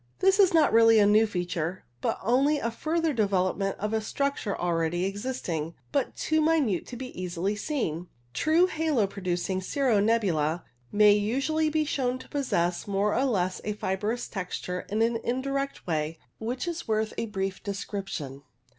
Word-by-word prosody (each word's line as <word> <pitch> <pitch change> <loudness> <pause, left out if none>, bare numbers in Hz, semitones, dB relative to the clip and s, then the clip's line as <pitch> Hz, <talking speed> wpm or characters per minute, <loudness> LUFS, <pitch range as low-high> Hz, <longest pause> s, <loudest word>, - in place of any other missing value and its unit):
This 385 +1 +3
is 385 -3 +6
not 315 -8 +4
really 225 0 +7
a 210 - +6
new 215 +2 +5
feature, 175 -2 -3 0.2
but - - 0
only 270 +7 +3
a 230 -4 -2
further 320 +5 0
development 195 -3 0
of 210 +2 -3
a 220 - +1
structure 275 -3 -2
already 175 0 0
existing, 195 -7 -3 0.2
but 280 -3 0
too 315 0 +1
minute 300 - +2
to 245 - -7
be 255 +1 -6
easily 180 +3 -2
seen. 200 - -2 0.3
True 315 - +4
halo 315 - +1
pro 195 0 -8
ducing 180 +1 -1
cirro 245 +1 +1
nebula 180 -8 +1 0.3
may 210 0 +6
usually 275 +10 +1
be 310 0 +1
shown 255 -3 -1
to - - -13
possess 175 -12 -1
more 200 +1 +1
or 265 - +2
less 185 -7 0
of - - -15
a 210 - 0
fibrous 210 +4 -2
texture 180 -2 -4
in 215 +2 +1
an 230 0 +1
indirect 275 +4 -2
way, 155 -1 -1 0.2
which 245 +7 -3
is 340 -1 -4
worth 220 0 0
a 230 - -2
brief 195 -2 -3
description. 195 -8 -5
210 Hz, 170 wpm, -27 LUFS, 185-270 Hz, 0.3 s, really